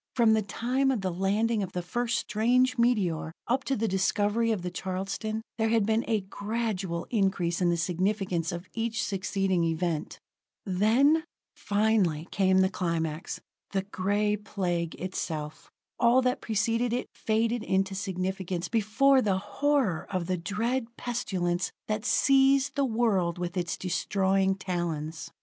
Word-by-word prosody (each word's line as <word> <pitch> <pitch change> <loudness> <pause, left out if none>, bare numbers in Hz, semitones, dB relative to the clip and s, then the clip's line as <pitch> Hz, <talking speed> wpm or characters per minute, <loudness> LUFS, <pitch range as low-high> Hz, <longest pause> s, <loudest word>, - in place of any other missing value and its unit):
From 230 -3 +5
the 220 - +3
time 250 +7 0
of 255 -6 0
the 185 -2 -2
landing 210 +5 +1
of 190 -2 -4
the 180 - -3
first 240 +5 -1
strange 250 +4 +2
meteor, 205 -10 +1
up 260 +3 0
to 270 - 0
the 225 -1 0
discovery 205 +4 +1
of 200 -5 -2
the 180 - -3
Charleston, 195 +5 -3 0.2
there 220 0 +2
had 225 -2 +3
been 220 +2 +1
a 220 -3 +1
gradual 200 -3 -3
increase 190 -5 +1
in 175 - +3
the 170 - +1
significance 180 0 0
of 175 +1 -6
each 230 0 -1
succeeding 195 -2 0
event. 165 -1 -2 0.5
Then 230 - +3 0.3
finally 200 -7 +1
came 190 -1 +3
the 190 - +4
climax: 165 -3 -2 0.3
the 195 -1 +1
Gray 205 +2 0
Plague 180 -5 -2
itself. 160 -4 -5 0.3
All 245 +2 +5
that 255 +1 0
preceded 230 +2 0
it 250 - -1
faded 225 +2 0
into 195 -2 0
significance 190 -2 -3
before 255 +5 +3
the 195 -5 +1
horror 265 - 0
of 185 -3 -2
the 185 +1 0
dread 230 +6 -2
pestilence 185 -7 -1 0.2
that 215 +1 -2
seized 270 +2 +4
the 280 0 +1
world 220 -8 +1
with 175 0 -4
its 175 -2 -2
destroying 190 +1 +1
talons. 170 -4 -3
200 Hz, 145 wpm, -28 LUFS, 180-230 Hz, 0.5 s, From